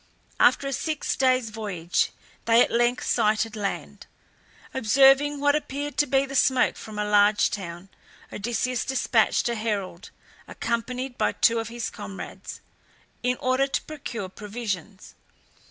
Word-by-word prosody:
After 275 - +4
a 275 - -2
six 310 +3 -2
days' 255 -4 +2
voyage 195 -6 -1 0.4
they 230 0 +5
at - - -3
length 240 +1 +1
sighted 220 0 +1
land. 200 -2 -5 0.7
Observing 270 +4 +4
what 285 0 +3
appeared 290 -1 -4
to 295 - +3
be 270 +1 +2
the 275 - -9
smoke 260 -2 +3
from 215 -1 -9
a 210 - -1
large 210 0 +4
town, 180 -1 -6 0.4
Odysseus 240 +3 -1
despatched 250 -4 +1
a 235 - 0
herald, 205 -5 -3 0.4
accompanied 245 +2 -3
by - - +1
two 230 0 +3
of 225 - -4
his 235 0 -4
comrades, 200 -2 -8 0.6
in 250 +1 0
order 255 +2 +1
to 275 - -2
procure 260 -9 -6
provisions. 205 -1 -6
235 Hz, 140 wpm, -25 LUFS, 210-265 Hz, 0.7 s, they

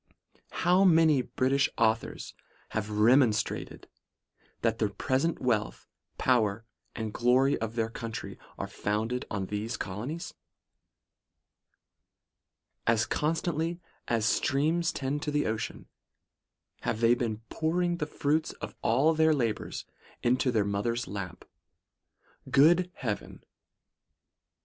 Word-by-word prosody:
' - - -35 0.2
How 180 +2 +5
many 160 -6 +5
British 135 +2 +1
authors 115 0 0 0.4
have 110 -1 -2
demonstrated, 110 +1 +2 0.8
that - - +1
the - - +2
present 135 +6 0
wealth, 110 - -1 0.3
power 115 -4 +2 0.3
and 110 -2 -4
glory 130 +3 +3
of 115 0 -4
their 115 -1 -1
country, 115 -1 -6 0.2
are - - -3
founded 110 +4 -2
upon 100 -2 -3
these 105 +4 -3
colonies? 120 - -5 2.5
As 115 -1 +3
constantly 165 +3 -1 0.3
as 115 -2 +1
streams 155 +7 +1
tend 140 +2 -2
to 150 - -2
the 145 0 +1
ocean 110 0 -3 0.9
have 110 - -2
they 115 0 +5
been 115 -3 -2
pouring 175 +2 0
the 150 - -2
fruits 155 +2 0
of - - -8
all 135 +8 +3
their 160 0 +4
labours 115 -6 -2 0.4
into 125 +2 +2
their 110 -4 +2
mother's 105 +3 -1
lap. 95 -2 -6 1.0
Good 175 +6 +5
heaven 110 -6 -5
125 Hz, 110 wpm, -29 LUFS, 110-150 Hz, 2.5 s, How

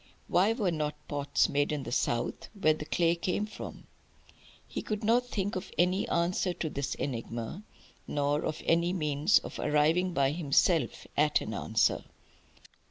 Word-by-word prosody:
Why 190 +6 +3
were 210 -6 0
not 150 -2 -2
pots 145 -1 +1
made 145 +1 +1
in 150 -2 -2
the - - -6
South, 120 -1 -1
where 155 -4 +4
the 155 0 -7
clay 170 +1 +2
came 180 +4 -1
from? 215 - -9 0.8
He - - -4
could 210 -1 -4
not 240 +3 +3
think 205 -4 -2
of 185 - -5
any 180 +2 +2
answer 175 +2 +1
to 160 - -3
this 140 0 -2
enigma, 115 - -4 0.5
nor 145 +1 0
of 155 - -3
any 170 +2 +2
means 150 +1 +3
of - - -4
arriving 155 +5 +2
by 140 -5 +2
himself 155 -2 +1
at 150 +1 +3
an - - -5
answer. - - +1
160 Hz, 160 wpm, -30 LUFS, 145-185 Hz, 0.8 s, where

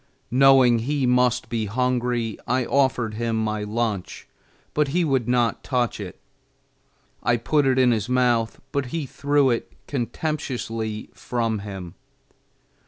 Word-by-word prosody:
Knowing 130 -2 +6
he 140 +3 -1
must 125 -1 +2
be 115 -3 -2
hungry, 120 -1 -1
I 125 +1 +1
offered 130 -5 +1
him 115 +1 -2
my 110 -1 -1
lunch, 105 -2 -3 0.5
but 150 -1 +2
he 170 +5 +1
would 135 -6 +1
not 120 -2 +1
touch 125 -5 -1
it. 95 -4 -7 1.0
I 120 - +2
put 145 +4 +1
it 130 -1 +2
in 130 -1 +5
his 110 0 -1
mouth, 120 -3 +1
but 140 -2 -1
he 155 +3 -3
threw 140 0 +2
it 115 - -2
contemptuously 120 -5 -3
from 115 -3 -2
him. 95 -4 -7
120 Hz, 135 wpm, -24 LUFS, 115-130 Hz, 1.0 s, Knowing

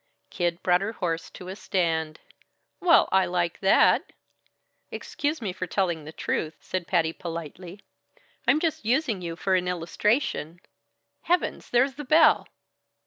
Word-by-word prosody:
Kid 175 0 -2
brought 180 0 +3
her 210 +3 -3
horse 165 -5 -3
to 180 - -11
a 190 - -6
stand. 160 -6 -1 0.6
"Well 355 -3 +5
I 190 0 +3
like 175 -2 -1
that!" 195 0 +4 0.8
"Excuse 290 -3 -3
me 190 -4 -2
for 185 0 -5
telling 170 -4 -1
the 155 - -8
truth," 160 0 -3
said 185 -2 -4
Patty 165 -3 +1
politely, 170 +3 -7 0.7
"I'm 305 - +5
just 320 -6 -1
using 235 -3 0
you 170 -1 -5
for 190 +2 -1
an 180 -1 +2
illustration 175 - -1 0.7
Heavens! 355 +1 0
There's 255 +3 +3
the 295 - -5
bell!" 310 +4 +5
180 Hz, 140 wpm, -26 LUFS, 170-225 Hz, 0.8 s, Well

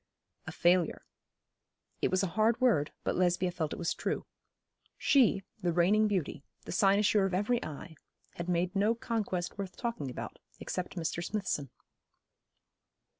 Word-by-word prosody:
A - - -4
failure. 175 -1 +2 1.0
It - - +2
was 185 +1 +1
a 180 - -2
hard 220 +2 +3
word, 220 - +3
but - - 0
Lesbia 180 0 +2
felt 160 -4 -3
it - - -4
was 170 - -1
true. - - -3 0.7
She, 235 -8 +4 0.2
the 175 -2 +1
reigning 195 +6 +4
beauty, 175 -7 -2 0.2
the - - -6
cynosure 200 +2 +4
of 185 - -2
every 225 +5 +1
eye, 155 +2 -7 0.4
had 175 +1 -5
made 180 +2 0
no 210 +4 +3
conquest 210 -6 -3
worth 190 -2 -5
talking 230 - -3
about, 125 - -7 0.2
except 180 +1 -4
Mr. 170 0 -2
Smithson. 180 - -2
185 Hz, 145 wpm, -31 LUFS, 175-210 Hz, 1.0 s, She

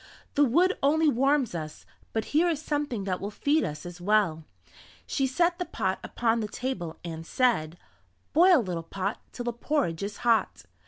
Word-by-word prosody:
"The 290 - +4
wood 345 - +3
only 310 +3 +3
warms 270 -2 +2
us, 155 -2 -6 0.3
but 220 -1 -1
here 335 +4 +4
is 320 -4 -1
something 290 -8 -2
that 185 -2 -2
will 200 - -3
feed 290 +8 +1
us 150 +2 -5
as 175 0 -9
well." 190 -5 +2 0.6
She 270 -2 0
set 345 +6 +1
the 360 - -1
pot 190 - -2
upon 230 -1 0
the 215 - -2
table 200 -9 -4
and 165 -1 -5
said: 175 -6 +1 0.6
"Boil 340 -3 +6
little 175 -4 -3
pot 190 +5 -4
Till 245 - -6
the 240 - -1
porridge 240 - -1
is 200 +1 -4
hot." 225 - +2
230 Hz, 175 wpm, -27 LUFS, 180-290 Hz, 0.6 s, Boil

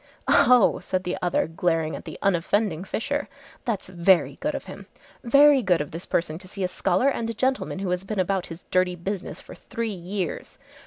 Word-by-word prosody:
"Oh!" 250 -4 +5
said 185 0 -2
the 180 - -2
other 175 -1 +1
glaring 165 -1 -1
at - - -9
the 160 - -8
unoffending 185 -1 +1
Fisher, 285 +8 -2 0.4
"that's 225 -6 -2
very 180 0 +2
good - - -2
of - - -5
him. - - -10 0.4
Very 280 +3 +6
good 180 -6 +2
of 150 - -4
this 165 +3 -7
person 165 -1 -1
to 185 - -11
see 195 +1 -5
a - - +2
scholar 180 +6 +1
and 230 -4 -2
a 230 - -4
gentleman 260 -2 -1
who 190 -1 -2
has 180 +1 -1
been 205 +1 -4
about 185 0 0
his 165 +1 -10
dirty 185 -1 +2
business 190 +2 -5
for - - -12
three 230 -2 -4
years. 180 -1 -5
185 Hz, 200 wpm, -25 LUFS, 175-220 Hz, 0.4 s, Very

